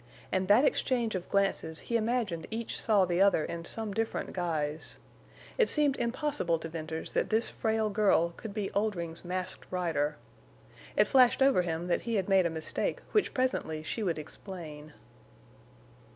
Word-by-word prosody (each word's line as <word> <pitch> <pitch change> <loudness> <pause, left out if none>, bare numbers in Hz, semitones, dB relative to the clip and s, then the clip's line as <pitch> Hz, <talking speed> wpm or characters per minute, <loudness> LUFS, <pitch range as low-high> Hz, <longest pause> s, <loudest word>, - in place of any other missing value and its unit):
In 185 0 0
that 215 +8 +6
exchange 240 -5 +1
of 185 -2 -4
glances 195 -5 0
he 235 - -3
imagined 220 -7 0
each 225 +1 -3
saw 210 -4 +4
the 175 +1 +1
other 195 -5 +4
in 170 0 -5
some 220 0 -3
different 225 +2 -2
guise. 160 -4 -2 0.6
It 470 - +4
seemed 295 -3 +3
impossible 235 - 0
to 165 0 -7
Venters 160 0 -5
that - - +1
this 225 +1 +2
frail 220 -1 0
girl 200 -5 +3
could 210 +5 -8
be 205 -1 -3
Oldring's 175 -6 -2
Masked 185 +1 -4
Rider. 155 -5 0 0.8
It - - +6
flashed 260 0 +5
over 270 -8 +5
him 170 -1 -3
that 180 - +1
he 230 -1 -2
had 195 -3 0
made 190 -2 +5
a - - -2
mistake 160 -1 -2
which 425 - +1
presently 205 -12 -1
she 220 - -3
would 175 -6 0
explain. 155 -2 -8
190 Hz, 165 wpm, -30 LUFS, 165-225 Hz, 0.8 s, that